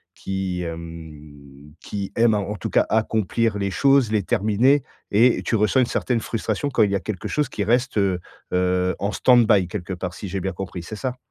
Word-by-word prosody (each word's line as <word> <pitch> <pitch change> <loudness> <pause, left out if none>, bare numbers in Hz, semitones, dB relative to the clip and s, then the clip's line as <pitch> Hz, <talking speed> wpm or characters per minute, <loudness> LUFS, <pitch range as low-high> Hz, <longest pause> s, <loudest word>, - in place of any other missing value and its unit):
qui 95 -2 -3
hem, 75 -4 -10
qui 100 -1 -5
aime, 115 -1 +4
a 105 - +1
en 105 +1 -4
tout - - -5
cas, - - +3
accomplir 110 0 0
les 100 - -1
choses, 135 +2 +3
les 105 -3 +1
terminer, 110 - +2 0.3
et 115 +4 +4
tu 115 - 0
ressens 105 +5 +2
une - - +3
certaine 120 0 -1
frustration 115 +4 -2
quand 135 - +1
il 100 - +2
y 100 - +1
a - - +1
quelque 105 -4 -5
chose 150 -3 -1
qui 105 - -3
reste, 120 +4 +1
heu 95 -3 +1 0.3
heu, 90 0 +1
en 100 +1 -2
stand-by, 115 -6 +4
quelque 95 0 -5
part, 90 0 -5
si 100 - -7
j'ai 95 +1 -3
bien 95 +1 -3
compris. 90 -1 -6
C'est 105 +6 -8
ça? 125 +2 -4
100 Hz, 205 wpm, -22 LUFS, 90-115 Hz, 0.3 s, aime